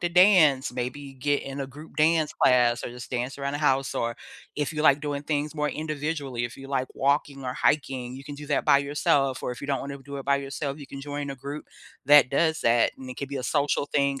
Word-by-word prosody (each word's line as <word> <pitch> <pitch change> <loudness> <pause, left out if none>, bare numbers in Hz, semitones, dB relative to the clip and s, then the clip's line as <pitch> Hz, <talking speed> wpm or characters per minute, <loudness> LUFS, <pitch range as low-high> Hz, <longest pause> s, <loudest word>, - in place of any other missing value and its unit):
to 175 - 0
dance, 175 -7 +5
maybe 130 +3 -5
get 145 +2 0
in 135 +1 -6
a 135 - -3
group 150 +4 -13
dance 155 0 +3
class 120 -2 +3
or - - -3
just 120 0 -10
dance 125 +2 -3
around 140 0 -2
the 145 - -2
house, 135 -2 +1
or 115 0 -1 0.4
if 145 0 -1
you 150 0 -2
like 145 -1 +5
doing 145 -1 -3
things 150 0 -2
more 150 -1 0
individually, 150 -5 -3
if 120 - -6
you 135 0 -10
like 130 -2 -1
walking 140 0 0
or 125 - -3
hiking, 130 -4 0
you 135 - -9
can 145 0 -7
do 145 0 -9
that 145 - +1
by - - +7
yourself, 140 -1 +1
or - - -2
if 125 - -7
you - - -4
don't 140 -1 0
wanna 140 0 -6
do 140 +1 -8
it 135 - -8
by 140 0 +4
yourself, 140 +1 -4
you 145 - -9
can 140 - -8
join 145 0 -5
a - - -4
group 140 +3 -7 0.4
that 145 -1 +7
does 160 +4 +1
that, 115 0 +3
and 130 -1 -9
it 125 - -7
could 140 - -5
be 140 - -4
a 125 - -4
social 145 +1 0
thing 140 -2 0
140 Hz, 250 wpm, -26 LUFS, 135-145 Hz, 0.4 s, by